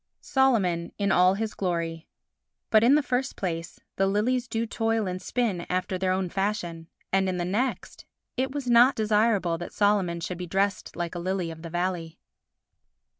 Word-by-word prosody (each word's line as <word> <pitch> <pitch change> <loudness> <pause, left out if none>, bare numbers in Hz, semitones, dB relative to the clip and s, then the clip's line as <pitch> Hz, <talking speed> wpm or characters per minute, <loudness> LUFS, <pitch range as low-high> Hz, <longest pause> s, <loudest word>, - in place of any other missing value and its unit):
Solomon 200 -11 +1
in 200 -1 +1
all 185 +1 +5
his 220 +1 -3
Glory 170 -3 -3 0.6
But, 215 0 +6
in 255 +5 +6
the 300 - +3
first 260 +1 -1
place, 170 -2 -4 0.2
the 195 - +3
lilies 240 +5 +1
do 230 -1 -1
toil 225 -1 0
and 185 0 -4
spin 215 -9 -1
after 185 0 -1
their 185 0 +1
own 185 0 0
fashion, 175 -4 -3 0.3
and, 190 0 +3
in 185 - -2
the 175 - -1
next, 230 +8 -2 0.3
it 265 +1 -1
was 280 -2 -4
not 240 +3 +6
desirable 210 -5 +2
that 175 - -7
Solomon 200 -5 +2
should 175 +1 -5
be 180 - -5
dressed 195 +2 -1
like 175 -1 -3
a 175 - -4
lily 180 -1 -2
of 160 0 -10
the 165 - -7
valley. 175 -1 -2
190 Hz, 175 wpm, -26 LUFS, 175-225 Hz, 0.6 s, But